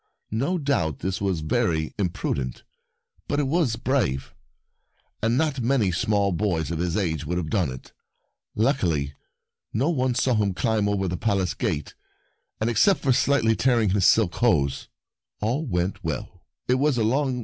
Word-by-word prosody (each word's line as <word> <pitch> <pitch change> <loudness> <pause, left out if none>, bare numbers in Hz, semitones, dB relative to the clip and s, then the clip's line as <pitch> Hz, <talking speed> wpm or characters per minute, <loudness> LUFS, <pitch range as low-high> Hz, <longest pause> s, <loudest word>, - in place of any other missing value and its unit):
No 135 - 0
doubt 140 - 0
this 95 +1 -3
was 95 -5 0
very 80 0 0
impru 90 -4 -1
dent, 65 -2 -5 0.6
but 145 - 0
it 145 - +1
was 150 -6 +1
brave, 115 - -1 0.9
and 115 +3 +2
not 150 -3 0
many 115 -5 +2
small 100 +3 +1
boys 85 -4 -1
of 80 - -3
his 85 -1 -1
age 80 -6 -1
would 90 +2 -1
have 80 -3 -3
done 90 -9 +1
it. 65 - -11 0.6
Luckily, 85 - +1 0.6
no 135 +10 +1
one 130 -5 0
saw 125 +1 +2
him 105 -4 +1
climb 110 -2 +1
over 100 -2 0
the 90 0 -2
Palace 95 -5 0
gate, 75 - -3 0.7
and, 110 - 0
except 190 - +3
for 135 - +3
slightly 120 -4 +3
tearing 115 -6 +2
his 100 -1 +3
silk 105 -6 +4
hose, 70 - +1 0.5
all 125 +9 -1
went 95 +1 -2
well. 80 -6 -5
100 Hz, 150 wpm, -25 LUFS, 85-125 Hz, 0.9 s, silk